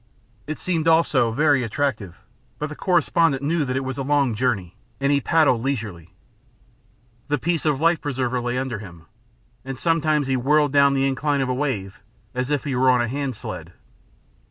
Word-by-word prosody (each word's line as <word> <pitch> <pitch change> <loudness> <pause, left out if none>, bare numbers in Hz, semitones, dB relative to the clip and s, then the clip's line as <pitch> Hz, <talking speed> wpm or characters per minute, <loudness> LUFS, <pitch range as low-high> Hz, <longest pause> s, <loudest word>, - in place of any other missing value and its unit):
It 155 - -4
seemed 165 -3 -1
also 155 -7 +3
very 145 +3 +2
attractive, 115 -6 -2 0.4
but 150 - -4
the 150 - -7
correspondent 165 -5 +2
knew 160 +2 +1
that 130 -1 -2
it 135 - -1
was 130 +1 -4
a - - -1
long 140 -3 +2
journey, 105 -6 -1 0.2
and 140 +1 +1
he 140 -1 +2
paddled 140 -6 +3
leisurely. 105 - -4 1.1
The 145 0 +1
piece 165 +2 -1
of 145 -3 +1
life 165 +1 +2
preserver 130 -3 -2
lay 120 +1 -2
under 130 -4 -3
him, 85 -6 -12 0.6
and 135 0 -6
sometimes 155 -2 +1
he 135 0 0
whirled 145 +3 +2
down 140 -1 +5
the 135 0 +2
incline 140 +1 0
of 130 - -1
a - - +1
wave 105 -8 -3 0.3
as 125 +1 -2
if 145 -3 0
he 140 -3 -2
were 130 +1 +3
on 125 -1 +4
a 120 - 0
handsled. 135 -1 -5
135 Hz, 180 wpm, -23 LUFS, 125-150 Hz, 1.1 s, down